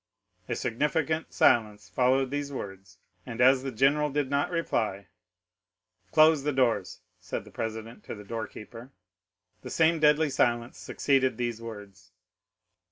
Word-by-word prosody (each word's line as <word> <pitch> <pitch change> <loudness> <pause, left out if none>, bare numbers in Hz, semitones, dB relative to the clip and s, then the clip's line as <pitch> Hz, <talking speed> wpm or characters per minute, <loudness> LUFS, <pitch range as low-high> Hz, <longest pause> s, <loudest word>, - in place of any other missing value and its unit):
A - - -1
significant 155 +6 -1
silence 105 -4 +2
followed 130 +6 +1
these 145 0 -3
words, 100 -6 -8 0.3
and 115 +1 -8
as 130 +1 +5
the 135 0 -4
general 140 +5 +2
did 140 -1 -2
not 140 0 +1
reply,—"Close 95 - -1
the 150 - 0
doors," 130 -4 0 0.2
said - - -5
the - - -14
president 110 +1 -6
to - - -6
the 105 - -11
door 110 +1 -5
keeper. 115 +5 -11 0.7
40042m - - -39
"'The - - -8
same 165 0 +2
deadly 150 0 +4
silence 120 -2 0
succeeded 130 -4 +1
these 120 -2 -3
words. 100 -5 -11
120 Hz, 140 wpm, -28 LUFS, 105-145 Hz, 0.7 s, as